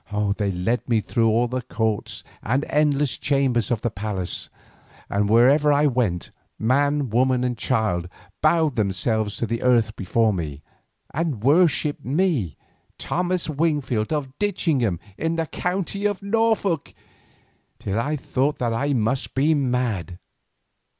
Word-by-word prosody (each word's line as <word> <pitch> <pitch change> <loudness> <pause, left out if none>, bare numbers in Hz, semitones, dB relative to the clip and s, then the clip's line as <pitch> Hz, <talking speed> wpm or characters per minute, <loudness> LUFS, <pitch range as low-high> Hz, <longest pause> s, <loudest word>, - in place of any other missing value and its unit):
They 100 -2 0
led 95 +8 -2
me 115 -2 +3
through 115 +1 +1
all 115 +3 +2
the 125 +1 -3
courts 110 -3 -2 0.2
and 130 +6 0
endless 145 -2 +1
chambers 135 -6 +1
of 115 -3 0
the 120 - -1
palace, 100 -4 -4 0.6
and 100 0 +1
wherever 135 +7 +5
I 145 +1 +3
went, 120 -11 0 0.3
man 140 +2 +1
woman 125 +2 +2
and 125 -1 -1
child 110 -8 0 0.3
bowed 155 -3 +2
themselves 105 +1 0
to - - -1
the 115 +1 -3
earth 115 -4 +2
before 110 +3 +1
me, 75 -5 -5 0.5
and 145 -8 -2
worshipped 145 -1 +3
me, 140 - 0 0.4
Thomas 180 0 -1
Wingfield 145 -7 0
of 140 -4 -2
Ditchingham, 150 - 0 0.2
in 165 +1 0
the 165 0 0
county 195 +5 -2
of 205 -1 -4
Norfolk, 215 -4 0 0.8
till 100 +3 -2
I 145 +6 -1
thought 140 +1 -1
that 120 -2 -1
I 140 +5 0
must 120 +2 -1
be 145 +4 +3
mad. 125 - -1
125 Hz, 135 wpm, -23 LUFS, 110-150 Hz, 0.8 s, wherever